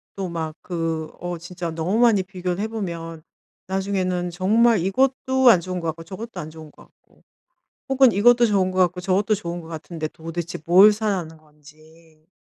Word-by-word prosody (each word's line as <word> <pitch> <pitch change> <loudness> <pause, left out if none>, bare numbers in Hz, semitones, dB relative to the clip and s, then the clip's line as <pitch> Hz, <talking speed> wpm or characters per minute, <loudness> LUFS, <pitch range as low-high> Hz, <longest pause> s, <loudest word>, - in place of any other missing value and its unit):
또 195 -2 -4
막 160 -2 -4
그 165 -3 -3
어 175 0 -4
진짜 170 0 -6
너무 165 +6 -1
많이 225 -6 +4
비교를 180 -1 -4
해 215 - -1
보면 170 -7 -6 0.5
나중에는 190 -2 -1
정말 215 +6 +3
이것도 260 +6 +2
안 180 -7 +6
좋은 185 +1 -4
것 165 - -4
같고 165 +1 -4
저것도 215 +7 -8
안 155 - -6
좋은 155 -1 -12
것 - - -18
같고 - - -29 0.7
혹은 265 -2 +5
이것도 240 +4 +5
좋은 190 -3 +1
것 185 - -4
같고 180 0 +2
저것도 195 +3 +1
좋은 175 -3 -5
것 165 - -12
같은데 160 -1 -6
도대체 165 +2 -6
뭘 190 +5 +7
사라는 195 -7 -3
건지 155 +1 -21
180 Hz, 330 characters per minute, -22 LUFS, 165-200 Hz, 0.7 s, 뭘